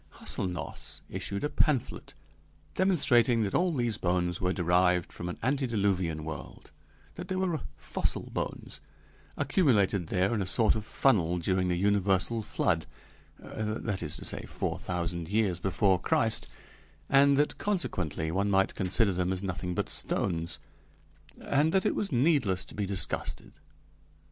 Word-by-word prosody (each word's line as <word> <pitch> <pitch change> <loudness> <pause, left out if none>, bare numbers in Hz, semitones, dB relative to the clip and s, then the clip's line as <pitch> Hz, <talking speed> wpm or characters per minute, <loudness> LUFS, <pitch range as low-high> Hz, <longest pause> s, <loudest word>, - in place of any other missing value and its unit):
Hâselnoss 90 -5 -4
issued 100 0 -4
a 145 - 0
pamphlet 140 -7 0 0.6
demonstrating 125 - +3
that 100 - -2
all 180 0 +2
these 120 -7 0
bones 90 -1 0
were 90 0 +1
derived 90 -1 +2
from 85 - -5
an 90 - -5
antediluvian 100 - 0
world: 80 -1 -8 0.4
that - - -8
they 185 - -2
were 185 -4 -1 0.2
fossil - - -2
bones, - - -5 0.6
accumulated 100 - +2
there 95 +6 +1
in 110 - 0
a 95 - -2
sort 110 +4 +4
of 110 -1 -4
funnel 90 -10 +2
during 95 +1 0
the 90 - +1
universal 100 +3 +2
flood 80 -6 0 0.5
that 110 -2 -4
is 75 -3 -4
to - - -7
say, - - -2
four - - -3
thousand 85 -1 -3
years 100 -5 +1
before 95 0 +2
Christ, 110 +4 +1 0.6
and 140 0 +5
that, 145 +1 +1
consequently, 85 - -1
one 100 +4 0
might 95 -1 +2
consider 95 +2 +2
them 90 +1 0
as 95 +1 -3
nothing 90 -2 -3
but - - -1
stones, 85 -3 -2 0.8
and 145 +3 +1
that 190 +1 +2
it 210 - +2
was 200 - -2
needless 120 - +2
to - - -13
be 100 -2 -2
disgusted. 95 -1 -2
100 Hz, 145 wpm, -29 LUFS, 90-120 Hz, 0.8 s, and